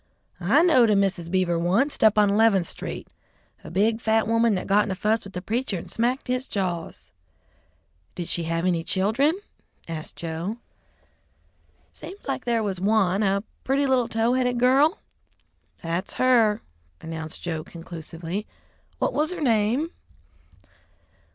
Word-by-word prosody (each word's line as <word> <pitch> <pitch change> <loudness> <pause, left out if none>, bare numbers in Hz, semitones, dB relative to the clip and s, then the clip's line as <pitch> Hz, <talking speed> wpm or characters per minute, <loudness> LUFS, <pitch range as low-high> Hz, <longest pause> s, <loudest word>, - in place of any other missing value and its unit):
"I 220 - +4
knowed 260 -10 +5
a 210 - +4
Mrs. 190 -4 0
Beaver 175 -2 +1
wunst, 210 - +1
up 215 -1 +5
on 205 -1 +5
Eleventh 205 -3 +4
Street - - -6 0.6
a - - -9
big, 220 +5 +1
fat 220 -1 +2
woman 230 -1 +3
that 185 - -3
got 205 +1 +4
in - - -5
a 190 - -2
fuss 215 +4 0
with 195 - -11
the 180 - -5
preacher 225 -1 -1
and 170 - -8
smacked 245 +4 -1
his 255 +1 -1
jaws." 180 -4 -4 1.0
"Did 175 -2 -5
she 170 - -2
have 165 +1 -1
any 170 -3 +1
children?" 235 - +1 0.5
asked 160 -2 -7
Joe. 170 +6 -4 1.3
"Seems 400 +2 -11
like - - -3
there 235 -2 +1
was 190 -3 -3
one, 200 -2 +2
a 200 -1 +1 0.2
pretty 275 +2 +1
little 260 -3 +2
tow 225 +2 +1
headed 250 -1 +1
girl." 275 - +4 0.9
"That's 170 +4 -3
her," 235 -5 +3 0.4
announced 160 -1 -7
Joe 160 -3 -3
conclusively. 170 +3 -7 0.5
"What - - 0
was 305 +1 +1
her 360 -1 -5
name?" 245 +4 +1
210 Hz, 150 wpm, -25 LUFS, 180-245 Hz, 1.3 s, knowed